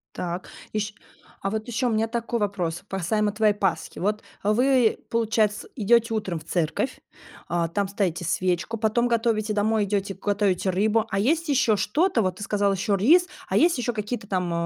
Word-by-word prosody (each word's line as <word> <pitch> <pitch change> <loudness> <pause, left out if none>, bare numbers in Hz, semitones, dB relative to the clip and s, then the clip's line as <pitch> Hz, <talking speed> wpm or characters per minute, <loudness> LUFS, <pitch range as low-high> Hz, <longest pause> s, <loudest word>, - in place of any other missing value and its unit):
Так. 175 +1 -4 0.2
Ещ 210 0 -2 0.5
а 195 - 0
вот 220 +3 -3
ещё 240 +2 0
у - - 0
меня 220 +1 +1
такой 235 +1 -2
вопрос, 185 -4 -2
касаемо 205 +3 0
твоей 210 -1 +3
Пасхи. 195 -4 -2
Вот, 210 +3 0 0.2
э, 210 - +2
вы, 250 -1 +3
получается, 225 - 0
идете 230 0 +3
утром 190 -6 -2
в - - -13
церковь, 170 - -1 0.5
а, 170 -1 0
там 200 +3 -1
ставите 180 -4 -1
свечку, 180 +5 0
потом 225 +2 +1
готовите 220 -2 +1
домой, 215 0 +2
идёте, 200 -1 -1
готовите 200 -2 0
рыбу, 215 +4 +2
а 195 - -1
есть 315 +9 +1
ещё 255 -6 +3
что-то? 255 - +1
Вот 185 -2 0
ты 205 - -9
сказала 200 -1 +1
ещё 195 +2 0
рис, 325 - +5 0.2
а - - 0
есть 335 -5 +4
ещё 240 -1 -1
какие-то 210 0 -4
там, 180 -3 -1
210 Hz, 180 wpm, -25 LUFS, 195-230 Hz, 0.5 s, рис